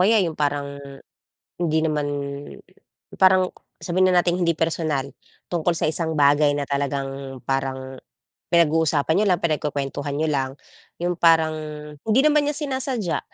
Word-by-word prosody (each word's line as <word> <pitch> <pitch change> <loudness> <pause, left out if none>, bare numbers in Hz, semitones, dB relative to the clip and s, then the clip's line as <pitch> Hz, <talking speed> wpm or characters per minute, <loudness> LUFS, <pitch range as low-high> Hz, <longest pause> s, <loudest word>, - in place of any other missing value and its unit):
kaya 210 +5 +4
yung 165 - -2
parang, 145 -1 -2 0.8
hindi 160 -2 0
naman 155 -2 0 1.1
parang, 185 -1 +4 0.3
sabihin 185 +1 +2
na 180 - +5
nating 175 0 0
hindi 170 - +3
personal. 155 -4 -1 0.4
Tungkol 175 0 0
sa 155 - +1
isang 160 0 +1
bagay 145 0 +4
na 145 -1 -3
talagang 135 -1 -3
parang 135 -1 -2 0.5
pinag-uusapan 160 -2 +2
niyo 210 - +2
lang, 180 -2 +2
pinagkukwentuhan 145 -2 -2
niyo 155 +2 0
lang, 135 -2 0 0.5
yung 175 -1 -1
parang 160 -2 +4 0.5
hindi 225 +4 +4
naman 300 -1 +3
niya 295 - -1
sinasadya. 260 - 0
160 Hz, 135 wpm, -23 LUFS, 140-175 Hz, 1.1 s, na